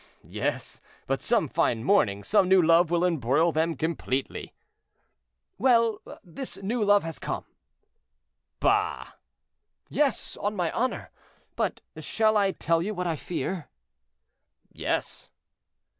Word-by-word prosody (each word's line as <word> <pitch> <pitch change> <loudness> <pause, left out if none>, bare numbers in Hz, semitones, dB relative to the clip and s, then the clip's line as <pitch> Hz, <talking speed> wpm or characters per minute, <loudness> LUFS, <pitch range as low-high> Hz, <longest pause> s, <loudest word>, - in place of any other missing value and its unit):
"Yes, - - -3 0.2
but - - -1
some - - +2
fine 115 -2 0
morning 100 - +2
some 195 - +3
new 190 0 +6
love 170 0 +5
will 175 +1 +2
embroil 160 0 +2
them 160 +1 0
completely." 140 -4 -3 1.1
"Well! 230 -3 +3 0.2
this 190 +9 -7
new 225 +3 0
love 205 0 +4
has 165 0 -5
come." - - -4 1.1
"Bah!" - - +1 0.8
"Yes, 285 -5 0
on 205 +1 -2
my 175 -4 0
honor; 255 +2 -2 0.4
but - - -1 0.2
shall 220 -1 +1
I 200 -2 +3
tell 165 -2 0
you 210 +4 -3
what 180 0 -2
I 165 -2 0
fear?" 175 +1 -4 1.0
"Yes." - - -3
180 Hz, 120 wpm, -27 LUFS, 160-210 Hz, 1.1 s, new